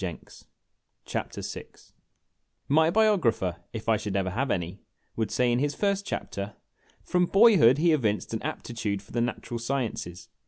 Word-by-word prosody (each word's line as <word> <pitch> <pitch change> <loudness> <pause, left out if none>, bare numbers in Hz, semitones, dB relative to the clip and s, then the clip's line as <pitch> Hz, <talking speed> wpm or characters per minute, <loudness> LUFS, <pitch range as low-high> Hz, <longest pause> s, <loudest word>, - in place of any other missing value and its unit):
A 90 - -1
LOST - - -17 0.7
OPPORTUNITY - - -4 1.0
M - - +4
Y 160 +1 +5
BIOGRAPHER, 170 - +2
if 110 -2 -7
I 110 -1 +4
should 100 -1 -4
ever 95 -1 0
have 130 +7 -1
any, 90 0 -2 0.4
would 110 -1 -1
say 125 -1 +2
in 120 - +2
his 145 +1 0
first 200 -1 0
chapter: 100 +1 -4 0.2
" - - -34
From 180 0 +1
boyhood 195 - +6
he 165 +2 +3
evinced 110 -7 0
an 110 - -2
aptitude 105 -4 -4
for - - -18
the 120 - 0
Natural 120 0 -3
Sciences. 115 -8 -3
120 Hz, 165 wpm, -27 LUFS, 105-160 Hz, 1.0 s, boyhood